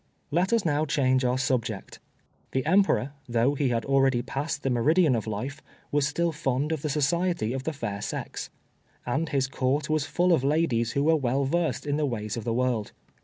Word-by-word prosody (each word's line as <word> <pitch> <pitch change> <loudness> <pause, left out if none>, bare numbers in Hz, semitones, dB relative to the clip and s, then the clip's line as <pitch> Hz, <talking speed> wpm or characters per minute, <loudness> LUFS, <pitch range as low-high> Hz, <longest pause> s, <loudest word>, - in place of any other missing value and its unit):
Let 175 +6 +1
us 230 -4 +2
now 150 -1 +2
change 130 -4 +2
our 125 0 +1
subject. 120 -6 -2 0.5
The 130 - 0
Emperor, 185 -6 +3 0.2
though 120 +4 +2
he 140 -2 0
had 115 -2 -1
already 135 -3 +3
passed 145 +3 -3
the 135 - 0
meridian 150 +4 +3
of 110 -1 -3
life, 130 +8 -4 0.3
was 145 -1 +2
still 170 +3 0
fond 140 0 -1
of 160 -3 -1
the 150 - -2
society 150 -3 0
of 135 0 -4
the 160 - 0
fair 115 -9 -4
sex. - - -5 0.6
And 150 +6 -1
his 135 -1 +1
Court 135 +3 -1
was 155 -2 +1
full 175 +4 +2
of 155 - +2
ladies 135 -6 +1
who 140 - +1
were 160 +2 +4
well 135 -1 0
versed 165 +3 0
in 145 0 0
the 150 -1 +1
ways 105 -4 -3
of 115 -2 -5
the 115 - 0
world. 125 -4 0
140 Hz, 200 wpm, -27 LUFS, 125-155 Hz, 0.6 s, were